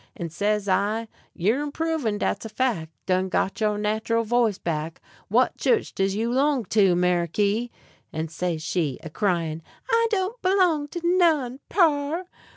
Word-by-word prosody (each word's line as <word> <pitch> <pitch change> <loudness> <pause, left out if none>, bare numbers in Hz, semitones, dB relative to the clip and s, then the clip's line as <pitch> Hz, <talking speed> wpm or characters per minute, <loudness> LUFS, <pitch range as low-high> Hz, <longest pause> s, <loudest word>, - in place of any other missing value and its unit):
And 170 -5 -5
says 205 +2 0
I: 210 +4 +1 0.3
"You're 215 +10 +1
improvin', 295 -6 -1
dat's - - -1
a 225 - -6
fac'; 215 -9 -1 0.2
done 185 0 +1
got 190 +4 -1
your 210 -1 +1
natural 220 +2 0
voice 230 -3 +1
back. 160 0 -3 0.3
What - - +2
chu'ch 455 -3 +1
does 195 0 0
you 230 +3 -1
'long 270 -2 +2
to, 195 -5 +5
Meriky?" 180 +6 +1 0.4
And 160 0 -4
says 165 -2 -2
she, 160 -7 -1
a 160 - -8
cryin': 165 -4 -1 0.3
"I 460 0 +4
don't 405 +2 -1
'long 365 -6 +3
to 345 +4 -6
none, 325 -8 +2
par." 320 -1 +2
215 Hz, 155 wpm, -25 LUFS, 180-290 Hz, 0.4 s, to